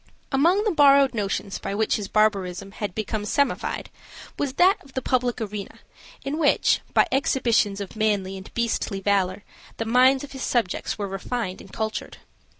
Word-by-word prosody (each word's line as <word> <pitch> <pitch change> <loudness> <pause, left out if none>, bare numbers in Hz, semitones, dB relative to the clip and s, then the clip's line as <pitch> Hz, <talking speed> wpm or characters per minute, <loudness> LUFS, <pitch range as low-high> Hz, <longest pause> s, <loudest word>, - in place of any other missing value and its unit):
Among 340 +9 +3
the 430 - +1
borrowed 280 -4 +5
notions 200 -2 -2
by 200 - -4
which 220 +1 +1
his 205 -2 -5
barbarism 195 -3 0
had 205 -2 -5
become 215 0 -2
semified 280 +7 -1 0.5
was 280 -3 -2
that 370 +7 +3
of 265 - -18
the 260 - -2
public 250 -1 0
arena, 210 -2 -6 0.5
in 290 +3 -2
which, 300 - +3
by - - +6
exhibitions 235 -6 +1
of 200 0 -7
manly 205 -3 0
and 190 0 -10
beastly 230 -3 -1
valor, 195 -1 0 0.3
the 225 - -2
minds 255 +4 +4
of 285 - -9
his 265 - -8
subjects 235 -8 -1
were 205 -2 -3
refined 195 +1 -4
and 195 - -14
cultured. 220 -1 -4
220 Hz, 165 wpm, -24 LUFS, 200-265 Hz, 0.5 s, by